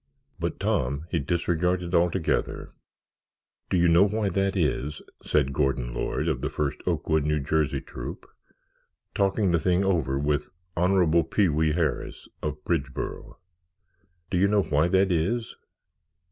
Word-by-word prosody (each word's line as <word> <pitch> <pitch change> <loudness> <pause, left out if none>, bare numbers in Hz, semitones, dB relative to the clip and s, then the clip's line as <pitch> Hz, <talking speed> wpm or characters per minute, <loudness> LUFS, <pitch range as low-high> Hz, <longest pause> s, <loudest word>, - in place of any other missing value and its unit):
But - - -3
Tom 70 +5 -1
he 85 - +1
disregarded 85 +3 0
altogether. 85 -1 0 1.0
"Do 95 - +1
you 85 0 +4
know 85 +1 +5
why 105 0 -1
that 95 +1 0
is?" 75 -3 -1 0.2
said 70 -3 +1
Gordon 65 -2 0
Lord, - - -2
of - - -1
the - - -1
First 75 0 -2
Oakwood, 80 -2 +1
N. 75 -3 -1
J., 80 -1 +1
Troop, - - -8 0.9
talking 100 -1 +1
the 85 - +3
thing 90 +3 +2
over 80 -8 +1
with 75 +1 0 0.3
Honorable 90 -2 +3
Pee 95 +4 +2
wee 80 0 +1
Harris, 80 -3 -2
of - - -4
Bridgeboro. 70 -6 -3 0.9
"Do 90 - +1
you 100 - +4
know 100 -1 +3
why 75 +1 +2
that 95 +1 +3
is?" 105 +8 -1
85 Hz, 140 wpm, -26 LUFS, 75-95 Hz, 1.0 s, know